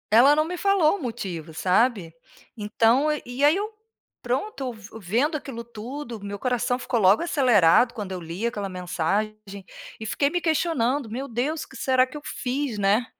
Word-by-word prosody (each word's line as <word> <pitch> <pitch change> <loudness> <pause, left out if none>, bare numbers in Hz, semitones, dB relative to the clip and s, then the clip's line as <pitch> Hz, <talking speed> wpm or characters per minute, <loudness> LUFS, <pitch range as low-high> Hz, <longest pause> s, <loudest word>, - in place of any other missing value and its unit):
Ela 265 +6 +7
não 310 - +3
me 355 +3 -5
falou 395 -2 +3
o - - -11
motivo, 185 - -5
sabe. 185 0 +1 0.4
Então 225 +6 +2 0.2
e 245 +4 0
aí 300 +3 +5
eu 420 +3 -3 0.5
pronto 260 - -3
vu 220 0 -12
vendo 240 - 0
aquilo 255 -5 -7
tudo, 235 +2 -7
meu 200 0 -5
coração 245 +1 0
ficou 250 -1 -1
logo 200 - +5
acelerado 240 - +4
quando 210 -5 -6
eu 185 - -4
li 170 +6 -5
aquela 210 -4 -2
mensagem 185 +3 -2 0.6
e - - -5
fiquei 280 +6 +1
me 350 +3 -1
questionando: 285 -6 0
"Meu 260 +5 -5
Deus 270 +7 -2
o - - -15
que - - -12
será 260 -1 +3
que 260 +3 -10
eu - - -9
fiz?", 270 -4 -3
né? 205 +4 +2
240 Hz, 175 wpm, -24 LUFS, 210-285 Hz, 0.6 s, Ela